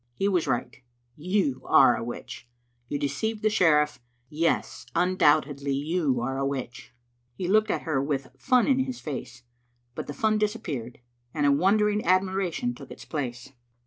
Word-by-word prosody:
He 195 Hz, -, 0 dB
was 180 Hz, -5 st, +1 dB
right; 120 Hz, -, -2 dB, 0.4 s
you 165 Hz, -5 st, 0 dB
are 120 Hz, -, +6 dB
a -, -, -4 dB
witch. 120 Hz, 0 st, -8 dB, 0.4 s
You 145 Hz, -, -1 dB
de 145 Hz, -, -1 dB
ceived 215 Hz, +10 st, -3 dB
the 215 Hz, -, +3 dB
sheriff; 150 Hz, -7 st, +3 dB, 0.3 s
yes, 165 Hz, +2 st, -1 dB
undoubtedly 145 Hz, -6 st, +2 dB
you 145 Hz, -2 st, 0 dB
are 135 Hz, +2 st, -2 dB
a -, -, 0 dB
witch." 125 Hz, -3 st, -4 dB, 0.4 s
He 180 Hz, -, -3 dB
looked 215 Hz, +3 st, +3 dB
at -, -, -1 dB
her 155 Hz, -5 st, 0 dB
with 140 Hz, -2 st, -3 dB
fun 255 Hz, -3 st, +3 dB
in 265 Hz, -2 st, +3 dB
his 260 Hz, -2 st, -2 dB
face, 125 Hz, -4 st, -7 dB, 0.5 s
but -, -, -6 dB
the 145 Hz, -, -5 dB
fun 215 Hz, -1 st, +1 dB
disappeared, 150 Hz, -, -3 dB, 0.3 s
and 145 Hz, -2 st, +1 dB
a 140 Hz, -, +5 dB
wondering 210 Hz, +7 st, +2 dB
admiration 190 Hz, +5 st, +1 dB
took -, -, -12 dB
its -, -, -11 dB
place. 125 Hz, -4 st, -5 dB
155 Hz, 165 wpm, -26 LUFS, 135-200 Hz, 0.5 s, are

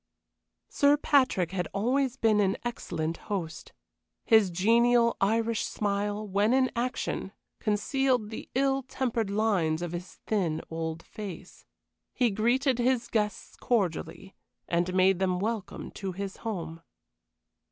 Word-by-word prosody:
Sir 285 Hz, +1 st, +4 dB
Patrick 255 Hz, -, +2 dB
had 180 Hz, -3 st, -2 dB
always 255 Hz, +5 st, +1 dB
been 220 Hz, -4 st, +3 dB
an 195 Hz, -2 st, +2 dB
excellent 165 Hz, -8 st, -3 dB
host. 180 Hz, -6 st, -4 dB, 0.5 s
His 220 Hz, -4 st, +5 dB
genial 235 Hz, +6 st, +3 dB
Irish 225 Hz, +2 st, +1 dB
smile, 205 Hz, +1 st, -2 dB
when 205 Hz, +4 st, +2 dB
in 260 Hz, -1 st, +3 dB
action, 250 Hz, +2 st, -2 dB, 0.3 s
concealed 240 Hz, +2 st, 0 dB
the 220 Hz, -, -7 dB
ill 270 Hz, 0 st, +2 dB
tempered 245 Hz, -4 st, -2 dB
lines 195 Hz, -6 st, +1 dB
of 175 Hz, -, -4 dB
his 175 Hz, +1 st, -7 dB
thin 175 Hz, -7 st, 0 dB
old 160 Hz, 0 st, -4 dB
face. 200 Hz, -5 st, -9 dB, 0.5 s
He 245 Hz, -3 st, +2 dB
greeted 245 Hz, +5 st, +1 dB
his 245 Hz, -1 st, +1 dB
guests 210 Hz, -2 st, -2 dB
cordially, 190 Hz, -4 st, -2 dB, 0.3 s
and 175 Hz, +1 st, 0 dB
made 185 Hz, 0 st, +4 dB
them 185 Hz, -1 st, +1 dB
welcome 215 Hz, 0 st, -4 dB
to 195 Hz, -2 st, -5 dB
his 195 Hz, +1 st, -5 dB
home. 170 Hz, -7 st, -5 dB
210 Hz, 125 wpm, -28 LUFS, 185-240 Hz, 0.5 s, His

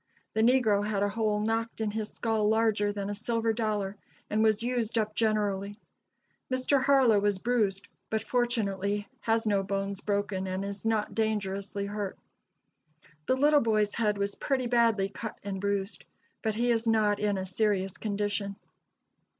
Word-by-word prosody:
The 220 Hz, -, +1 dB
negro 225 Hz, -4 st, +4 dB
had 205 Hz, -1 st, 0 dB
a 205 Hz, -, +2 dB
hole 210 Hz, 0 st, 0 dB
knocked 225 Hz, +1 st, -1 dB
in 220 Hz, -2 st, -1 dB
his 215 Hz, 0 st, -3 dB
skull 220 Hz, -2 st, 0 dB
larger 220 Hz, -2 st, +2 dB
than 200 Hz, -1 st, -4 dB
a 205 Hz, -, -2 dB
silver 225 Hz, +1 st, 0 dB
dollar, 210 Hz, -3 st, -2 dB, 0.3 s
and 215 Hz, +1 st, +2 dB
was 220 Hz, 0 st, +2 dB
used 240 Hz, -2 st, -1 dB
up 215 Hz, -1 st, 0 dB
generally. 205 Hz, -2 st, 0 dB, 0.7 s
Mr. 260 Hz, +1 st, +2 dB
Harlow 265 Hz, -7 st, +5 dB
was 205 Hz, -1 st, +1 dB
bruised, 205 Hz, -3 st, 0 dB, 0.2 s
but 220 Hz, -1 st, -1 dB
fortunately 205 Hz, -5 st, 0 dB
has 225 Hz, 0 st, +1 dB
no 205 Hz, -2 st, +2 dB
bones 195 Hz, 0 st, -3 dB
broken, 200 Hz, -2 st, -1 dB
and 190 Hz, +1 st, -2 dB
is 200 Hz, +2 st, -5 dB
not 220 Hz, -2 st, 0 dB
dangerously 200 Hz, -2 st, -1 dB
hurt. 205 Hz, -1 st, -4 dB, 1.1 s
The 255 Hz, -, +3 dB
little 290 Hz, +2 st, +4 dB
boy's 215 Hz, -2 st, +2 dB
head 210 Hz, -3 st, +1 dB
was 200 Hz, 0 st, -1 dB
pretty 265 Hz, -3 st, -1 dB
badly 230 Hz, -5 st, +3 dB
cut 220 Hz, +2 st, -6 dB
and 195 Hz, -2 st, -4 dB
bruised, 200 Hz, 0 st, -2 dB, 0.4 s
but 220 Hz, -2 st, -1 dB
he 240 Hz, +2 st, +2 dB
is 230 Hz, 0 st, 0 dB
not 215 Hz, -2 st, +3 dB
in 205 Hz, -1 st, +1 dB
a 190 Hz, -, -3 dB
serious 195 Hz, -1 st, 0 dB
condition." 205 Hz, -1 st, -2 dB
210 Hz, 160 wpm, -29 LUFS, 200-225 Hz, 1.1 s, Harlow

